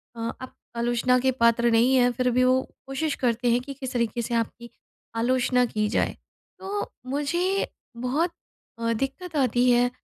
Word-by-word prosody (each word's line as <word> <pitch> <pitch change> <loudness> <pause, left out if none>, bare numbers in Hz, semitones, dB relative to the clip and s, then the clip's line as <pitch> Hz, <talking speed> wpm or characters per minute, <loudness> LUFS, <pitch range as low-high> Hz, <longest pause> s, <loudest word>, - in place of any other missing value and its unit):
अ 230 0 -3
आप 260 - -8 0.2
आलोचना 240 +1 +2
के 260 +1 +2
पात्र 235 0 +4
नहीं 240 +4 +4
हैं 245 -1 +4
फिर 250 +1 0
भी 250 +1 +3
वो 255 +1 +4 0.3
कोशिश 280 +3 -1
करते 240 0 +2
हैं 240 - +3
कि 275 +2 -7
किस 260 -1 -6
तरीके 235 -1 0
से 235 - -4
आपकी 235 +1 -3 0.5
आलोचना 250 +1 +2
की 215 -3 -1
जाए। - - 0 0.4
तो 405 +2 -4 0.2
मुझे 345 +8 0 0.3
बहुत 275 +8 0 0.5
अ, 230 0 0
दिक्कत 270 +8 -4
आती 250 -2 +3
है 245 0 +4
250 Hz, 165 wpm, -25 LUFS, 235-270 Hz, 0.5 s, पात्र